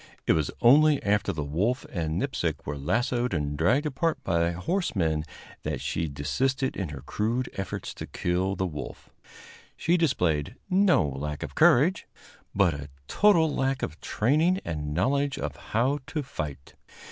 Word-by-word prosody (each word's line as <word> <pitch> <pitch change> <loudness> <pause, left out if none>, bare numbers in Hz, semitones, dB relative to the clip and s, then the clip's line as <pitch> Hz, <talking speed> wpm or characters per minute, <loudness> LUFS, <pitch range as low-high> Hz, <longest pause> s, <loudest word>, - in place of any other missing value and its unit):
It - - +4
was 75 -4 0
only 150 +5 +6
after 100 -1 +1
the 80 -5 -3
wolf 100 - -1
and 80 -2 -2
Nipsic 80 - -2
were 75 - -3
lassoed 120 - 0
and 75 -2 -2
dragged 115 - +2
apart 155 +3 0
by 85 0 +1
horsemen 90 - -1 0.4
that - - -3
she 80 0 -2
desisted 130 - -1
in 95 -5 -3
her 70 -3 -7
crude 115 - -2
efforts 95 -2 -5
to - - -7
kill 95 +2 -1
the 95 - -1
wolf. 75 -5 -7 0.7
She 175 +2 +2
displayed 90 - +1 0.2
no 185 - +4
lack 75 +2 -4
of - - -6
courage, 150 +10 +4 0.5
but 95 -4 +4
a 70 0 -7 0.2
total 170 -7 +4
lack 135 -1 0
of 80 - -5
training 155 - +2
and 75 -2 -3
knowledge 135 - +1
of - - -4
how 130 +6 0
to 150 +1 -3
fight. 75 - -6
100 Hz, 155 wpm, -27 LUFS, -, 0.7 s, only